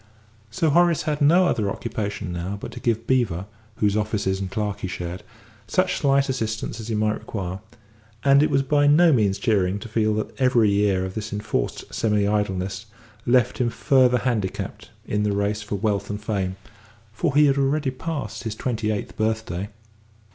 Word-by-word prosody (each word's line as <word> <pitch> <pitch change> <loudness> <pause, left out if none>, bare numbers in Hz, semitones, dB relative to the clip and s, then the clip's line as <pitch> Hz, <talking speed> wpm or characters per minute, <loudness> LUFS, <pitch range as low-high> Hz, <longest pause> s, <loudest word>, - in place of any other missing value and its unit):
So 150 +8 +1
Horace 170 +1 +4
had 150 -1 -2
no 170 +6 +5
other 110 - +1
occupation 105 -3 -4
now 90 +4 -4
but - - -7
to - - -8
give 115 -1 -1
Beevor, 110 -9 +1 0.3
whose 105 -1 +1
offices 105 -3 0
and 95 -1 -3
clerk 105 0 -2
he - - -3
shared, 90 -1 -5 0.5
such 185 +10 +1
slight 140 -1 +3
assistance 115 -4 -3
as 110 - -7
he 115 - -1
might 105 0 0
require, 95 -3 -5 0.6
and 140 0 +6
it 150 - +3
was 135 - +2
by 145 +1 +3
no 160 +3 +6
means 105 -5 +2
cheering 100 -3 +1
to 105 - -8
feel 110 -1 +1
that 110 - -3
every 120 -5 +4
year 100 -2 +2
of 95 - -6
this 110 +1 -5
enforced 105 +2 -3
semi 105 -2 +1
idleness 100 0 -1 0.4
left 125 0 +3
him 120 -2 +2
further 125 +1 +3
handicapped 115 -7 -3 0.2
in 105 - -1
the 105 -1 +1
race 100 +1 0
for 105 -1 -4
wealth 100 -1 -1
and 105 0 -5
fame, 95 -4 -2 0.6
for 145 +4 -1
he 150 0 +6
had 140 -1 +3
already 140 0 +1
passed 145 +3 -5
his 110 -2 -4
twenty 115 -2 -2
eighth 105 -1 -3
birthday. 110 -3 -2
110 Hz, 180 wpm, -23 LUFS, 100-130 Hz, 0.6 s, and